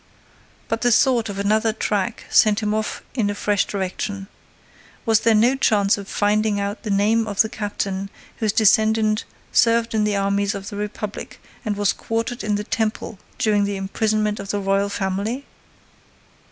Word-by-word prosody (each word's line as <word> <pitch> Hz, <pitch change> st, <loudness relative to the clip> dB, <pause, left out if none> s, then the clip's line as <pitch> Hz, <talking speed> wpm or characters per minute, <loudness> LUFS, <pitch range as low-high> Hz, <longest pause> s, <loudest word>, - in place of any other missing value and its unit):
But 225 Hz, -, -2 dB
the 245 Hz, -, +3 dB
thought 235 Hz, -2 st, +3 dB
of 200 Hz, -, -5 dB
another 215 Hz, +3 st, +2 dB
track 210 Hz, -3 st, -2 dB
sent 215 Hz, +1 st, +4 dB
him 210 Hz, 0 st, 0 dB
off 215 Hz, 0 st, -3 dB
in 225 Hz, -6 st, 0 dB
a 205 Hz, -, -2 dB
fresh 205 Hz, 0 st, +1 dB
direction. 195 Hz, +1 st, -4 dB, 0.8 s
Was 225 Hz, -1 st, +4 dB
there 225 Hz, -1 st, +3 dB
no 235 Hz, +5 st, +4 dB
chance 210 Hz, -6 st, +3 dB
of 200 Hz, -1 st, -8 dB
finding 210 Hz, 0 st, +1 dB
out 200 Hz, +2 st, -3 dB
the 215 Hz, -, -6 dB
name 215 Hz, +3 st, +2 dB
of 205 Hz, -2 st, +2 dB
that 220 Hz, -, -6 dB
captain 200 Hz, -2 st, -3 dB, 0.3 s
whose 220 Hz, -2 st, +1 dB
descendant 215 Hz, 0 st, +3 dB, 0.3 s
served 230 Hz, -1 st, +3 dB
in 215 Hz, -1 st, +2 dB
the 210 Hz, -1 st, +1 dB
armies 200 Hz, +1 st, 0 dB
of 200 Hz, 0 st, -6 dB
the 205 Hz, -, -8 dB
Republic 210 Hz, 0 st, -6 dB, 0.2 s
and 210 Hz, -4 st, -2 dB
was 205 Hz, -1 st, +2 dB
quartered 230 Hz, +2 st, -3 dB
in 210 Hz, -1 st, 0 dB
the 205 Hz, -, -2 dB
Temple 215 Hz, -2 st, -2 dB, 0.2 s
during 215 Hz, -4 st, +2 dB
the 200 Hz, 0 st, -1 dB
imprisonment 210 Hz, +2 st, -1 dB
of 195 Hz, -, -7 dB
the 205 Hz, -, -1 dB
Royal 195 Hz, +1 st, +1 dB
family? 200 Hz, +7 st, -2 dB
210 Hz, 170 wpm, -22 LUFS, 200-220 Hz, 0.8 s, sent